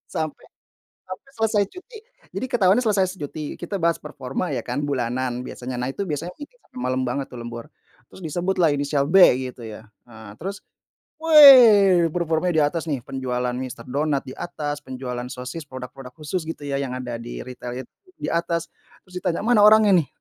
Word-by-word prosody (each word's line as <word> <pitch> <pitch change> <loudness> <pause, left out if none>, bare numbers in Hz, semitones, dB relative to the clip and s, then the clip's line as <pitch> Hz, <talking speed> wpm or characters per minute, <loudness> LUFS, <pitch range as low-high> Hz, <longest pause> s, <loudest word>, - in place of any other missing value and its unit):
sampai 155 -2 -3 0.7
sampai 185 +8 -9
selesai 220 -2 +2
cuti 440 +6 -12 0.3
jadi - - -5
ketauannya 225 +1 +3
selesai 200 -3 +2
s 185 - -6
cuti, 150 0 -6
kita 185 +2 -5
bahas 170 0 +2
performa 150 +3 -5
ya - - -1
kan 145 - -3
bulanan 125 -2 -2
biasanya, 125 0 -6
nah 125 - -2
itu 200 +9 -3
biasanya 165 0 -4
meeting 310 +12 -12
sampai - - -28
malam 130 0 0
banget 135 +1 -4
tuh 120 - -8
lembur, 120 0 -8 0.4
terus - - -13
disebut 180 +3 -2
lah 165 - +5
inisial 140 0 0
B 130 -8 +5
gitu 125 -2 -11
ya, 110 0 -10 0.2
eee, 110 -3 -13
terus, 195 +4 -6 0.6
weh! 250 - +8
Performanya 170 0 0
di - - +4
atas 165 +1 -4
nih, 145 -6 -2
penjualan 125 -1 -3
Mr. 125 -1 -7
Donut 145 +1 0
di 130 - -8
atas, 150 -4 -5
penjualan 125 -1 -5
sosis 130 +5 -7
produk-produk 130 -1 -10
khusus 155 +3 -3
gitu 150 -3 -7
ya 140 - -1
yang 135 -2 -3
ada 120 -2 -5
di 115 +1 -8
retail 125 0 -7
itu 125 - -10 0.3
di - - -3
atas, 170 0 -1 0.4
terus 180 - -17
ditanya, 170 - 0
"Mana 220 -2 +4
orangnya 210 -2 +7
nih? - - -22
150 Hz, 185 wpm, -23 LUFS, 125-185 Hz, 0.7 s, weh